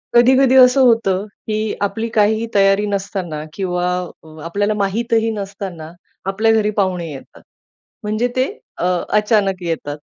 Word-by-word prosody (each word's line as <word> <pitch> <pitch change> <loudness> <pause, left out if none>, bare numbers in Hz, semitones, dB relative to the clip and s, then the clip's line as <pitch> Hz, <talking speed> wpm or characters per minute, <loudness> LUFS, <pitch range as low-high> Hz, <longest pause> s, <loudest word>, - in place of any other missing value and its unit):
कधी-कधी 260 +2 +5
असं 255 +1 +6
होतं 210 -5 +2 0.2
की 215 - -1 0.3
आपली 220 +3 -1
काहीही 220 +1 +2
तयारी 195 +1 +4
नसताना 190 -6 -3
किंवा 180 -1 -2 0.4
अ, - - -16 0.2
आपल्याला 205 +5 0
माहितही 225 +3 0
नसताना 195 -6 -7 0.3
आपल्या 210 +4 +1
घरी 215 -1 +2
पाहुणे 185 -4 0
येतात. 135 -2 -12 0.6
म्हणजे 215 +3 0
ते 255 0 +2 0.3
अ, - - -4 0.3
अचानक 205 -3 +1
येतात. 160 -3 -3
205 Hz, 130 wpm, -18 LUFS, 185-225 Hz, 0.6 s, असं